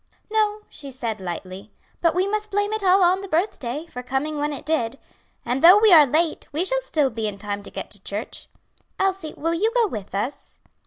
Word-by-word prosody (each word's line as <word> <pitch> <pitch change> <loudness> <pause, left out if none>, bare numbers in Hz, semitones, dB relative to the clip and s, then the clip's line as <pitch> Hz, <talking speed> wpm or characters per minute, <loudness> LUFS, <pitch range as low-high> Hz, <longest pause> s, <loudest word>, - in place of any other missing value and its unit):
"No," 425 -1 +1
she 285 -2 -9
said 230 -5 -4
lightly; 185 +3 -6 0.3
"but 335 -1 +2
we 370 +2 +2
must 425 +1 -1
blame 410 +1 +1
it 435 -2 -2
all 375 0 +5
on 365 +2 +3
the 395 - -7
birthday, 315 - -2
for 250 -7 -8
coming 270 +4 -2
when 295 +1 -1
it 285 - -7
did. 275 -5 0 0.5
And 245 +3 -1
though 360 +4 +10
we 425 -2 +6
are 305 -4 +8
late, 315 +4 0
we 315 +5 0
shall - - +2
still 300 - 0
be 220 -1 -3
in 205 -1 -5
time 205 0 -4
to - - -10
get - - -7
to - - -6
church. - - -5 0.5
Elsie, 380 -5 -1
will 330 +2 -1
you 420 +7 +1
go 475 -2 +4
with 210 - -6
us?" 235 +8 -5
315 Hz, 215 wpm, -23 LUFS, 245-390 Hz, 0.5 s, though